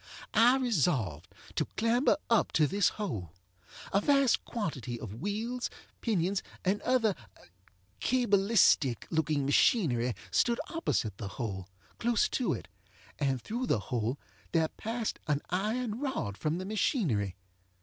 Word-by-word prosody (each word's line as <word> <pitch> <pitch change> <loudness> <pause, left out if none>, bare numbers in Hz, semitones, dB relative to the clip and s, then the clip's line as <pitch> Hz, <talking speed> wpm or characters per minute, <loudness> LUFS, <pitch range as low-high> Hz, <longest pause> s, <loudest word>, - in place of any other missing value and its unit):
I 240 +3 +6
resolved 145 - 0 0.3
to - - 0
clamber 235 +6 +3
up 230 -2 +3
to 155 - +4
this 200 +6 +2
hole. 100 - -4 0.6
A 195 - +4
vast 275 0 +3
quantity 130 - -4
of 115 0 -8
wheels, 225 +5 -2 0.3
pinions, 195 -3 +1 0.2
and 195 +3 +1
other 240 -5 +2 0.9
cabalistic 200 - +3
looking 155 -3 +1
machinery 130 - +3 0.2
stood 235 0 +2
opposite 115 - -1
the 105 - -4
hole, 95 -6 -4 0.3
close 235 -1 +2
to 255 - 0
it; - - -4 0.5
and 135 -3 +1
through 235 - -3
the - - +3
hole 120 +2 0 0.4
there 160 -2 +3
passed 225 0 -3
an 145 -2 +2
iron 215 +4 -1
rod 260 - -2
from 155 +9 -1
the 185 - -4
machinery. 155 - 0
195 Hz, 130 wpm, -31 LUFS, -, 0.9 s, I